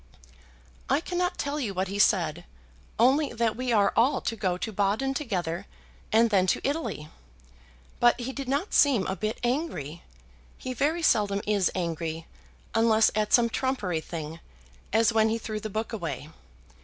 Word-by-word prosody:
"I 275 - +3
cannot 360 +2 -2
tell 285 +1 -2
you 215 -8 -3
what 190 +1 -1
he 200 +2 -4
said, - - +2 0.5
only 270 +6 +3
that 230 -1 0
we 255 0 -2
are 205 -3 +3
all 250 +5 +3
to 230 - -2
go 185 -4 -1
to 220 - -4
Baden 210 +7 0
together, 190 - -3 0.4
and 225 +1 +4
then 190 -2 +3
to 185 - +1
Italy. 280 - -3 0.9
But 240 +1 +4
he 255 +2 -4
did 275 -2 -5
not 285 +9 -1
seem 255 -10 +4
a 190 - -2
bit 215 +2 -3
angry; 240 - -2 0.6
he 255 - -5
very 310 +7 0
seldom 205 -8 +3
is 205 -3 +2
angry, 165 -2 -3 0.5
unless 225 -1 +4
at 215 0 -1
some 240 -1 +5
trumpery 210 -13 -1
thing, 160 0 -7 0.5
as 225 +1 +3
when 220 0 +3
he 225 - 0
threw 215 -1 -5
the 215 - -5
book 220 +3 -4
away. 160 - -5
220 Hz, 165 wpm, -27 LUFS, 190-255 Hz, 0.9 s, some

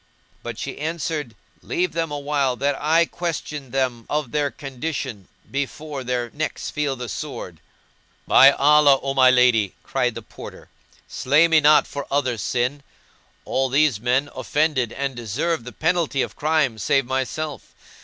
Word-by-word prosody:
but - - -6
she - - -6
answered, 155 -5 -3 0.3
"Leave 180 0 -1
them 165 -1 -2
awhile 140 -3 -1
that 140 +3 0
I 165 +3 +4
question 150 -5 -5
them 125 -3 -2
of 150 -5 -2
their 145 -1 0
condition, 135 - -5 0.2
before 140 +1 -4
their 125 -1 -2
necks 155 +1 -4
feel 150 -3 -1
the 125 -1 -6
sword." - - -6 0.7
"By 135 - +8
Allah, 145 -1 +5
O 135 0 -1
my 130 -1 +6
lady!" 125 -6 +3
cried 125 -3 -1
the - - -7
Porter, - - -11 0.4
"slay 145 +6 +3
me 165 -1 +5
not 150 0 +5
for 140 -1 -6
other's 130 -6 0
sin; 125 +6 -1 0.6
all 135 0 0
these 140 -4 +2
men 125 +5 +1
offended 130 -2 0
and 140 -1 -3
deserve 120 - -2
the 125 - -7
penalty 160 -3 0
of - - -7
crime 150 -7 +1
save 135 +6 +2
myself. 135 +2 -4
140 Hz, 150 wpm, -22 LUFS, 125-150 Hz, 0.7 s, By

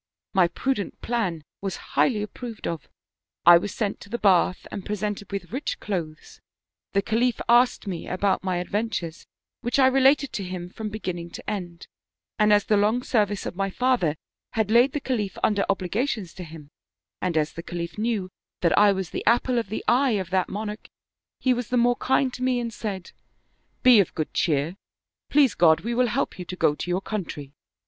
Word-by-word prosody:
" - - -67
My 185 -3 +5
prudent 255 +2 -2
plan 190 -10 -1 0.2
was 195 -2 -3 0.2
highly 215 -6 +2
approved 225 +2 -7
of; 165 -5 -4 0.6
I 170 0 +9
was 200 +3 -4
sent 205 -3 -2
to - - -13
the 235 - -2
bath 185 -3 +3
and 200 - -5
presented 205 0 -4
with 200 0 -5
rich 265 +5 -3
clothes; 165 -7 -5 0.5
the 200 0 +2
Khalif 235 +3 +1
asked 240 +1 +4
me 180 -4 -5
about 190 +1 0
my 185 -2 0
adventures, 180 -3 -3 0.3
which 240 +2 0
I 270 - +6
related 270 +2 +4
to 200 - -3
him 180 -1 -6
from 215 +1 -5
beginning 180 -5 -5
to - - -10
end; 175 -5 -5 0.5
and 210 0 +4
as 205 -1 +5
the 210 - +3
long 215 +5 +2
service 210 -5 0
of - - -5
my 195 +1 -1
father 240 -8 +1 0.4
had 220 -2 0
laid 245 +4 +5
the 295 - -1
Khalif 210 -9 -2
under 205 -2 +2
obligations 200 +1 -1
to 185 - -8
him, 155 -3 -11 0.5
and 175 -3 0
as 155 0 0
the 165 - -6
Khalif 170 +2 -6
knew 215 -5 -1 0.3
that 170 - +3
I 205 0 +6
was 190 -3 -3
the - - -4
apple 240 +2 +3
of 225 - -4
the 220 - -4
eye 250 -2 +3
of 190 -2 -4
that 185 -1 +1
monarch, 210 +1 -5 0.5
he 255 - +3
was 245 -2 -3
the 250 - 0
more 245 0 +3
kind 260 0 +1
to - - -8
me 255 -1 +1
and 235 -1 -4
said: 195 -5 -5 0.4
* - - -44
Be 250 -3 +8
of 195 - +1
good 155 - -3
cheer! 155 +2 0 0.5
Please 280 -4 +4
God, 160 -2 +4
we 235 +2 -2
will 250 +1 +3
help 210 - -2
you 180 - -5
to 185 - -6
go 150 - +3
to 165 - -6
your 180 +2 0
country.' 160 -10 -5
205 Hz, 200 wpm, -25 LUFS, 180-235 Hz, 0.6 s, I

